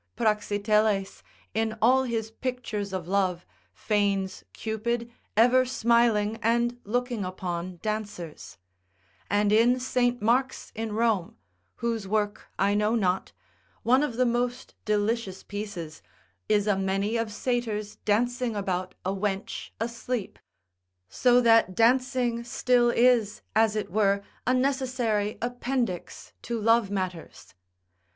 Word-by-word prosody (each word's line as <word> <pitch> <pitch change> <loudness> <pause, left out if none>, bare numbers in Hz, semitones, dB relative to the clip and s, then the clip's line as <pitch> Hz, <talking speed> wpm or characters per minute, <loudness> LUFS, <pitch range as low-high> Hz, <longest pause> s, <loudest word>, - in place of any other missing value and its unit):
Praxiteles, 210 -2 +1 0.3
in 220 0 -1
all 260 +4 +4
his 225 -2 -2
pictures 225 -5 -4
of 185 -3 -4
love, 185 -2 0 0.3
feigns 200 -3 -1
Cupid 230 +2 -3 0.3
ever 250 +3 +6
smiling, 235 -3 +2
and 235 +2 +1
looking 245 0 -1
upon 180 -1 -4
dancers; 210 -7 -5 0.7
and 205 0 +2
in 235 +4 +4
St. 245 -1 +1
Mark's 250 +4 0
in 220 -1 -4
Rome 220 -5 0 0.4
(whose 230 -4 -2
work 205 0 -1
I 200 +1 +2
know 210 +2 +2
not), 190 -4 0 0.5
one 250 +4 +4
of 255 -6 -2
the 255 - +3
most 245 +1 -1
delicious 210 -2 -1
pieces, 200 -7 -6 0.5
is 205 -1 +3
a 205 -2 +2
many 195 +3 0
of 230 -2 -1
satyrs 215 -2 -2
dancing 240 +2 0
about 185 -2 -2
a 190 - +1
wench 195 0 -3
asleep. 235 -1 -4 0.7
So 245 - +4
that 225 -5 +4
dancing 245 0 +2
still 240 0 +2
is 235 -4 +3
as 220 -1 +4
it 210 -4 -3
were 200 0 +2 0.2
a 255 - +4
necessary 255 -5 0
appendix 245 -5 -3
to 235 -1 -3
love 225 -1 +3
matters. 185 -4 -5
220 Hz, 120 wpm, -27 LUFS, 205-240 Hz, 0.7 s, ever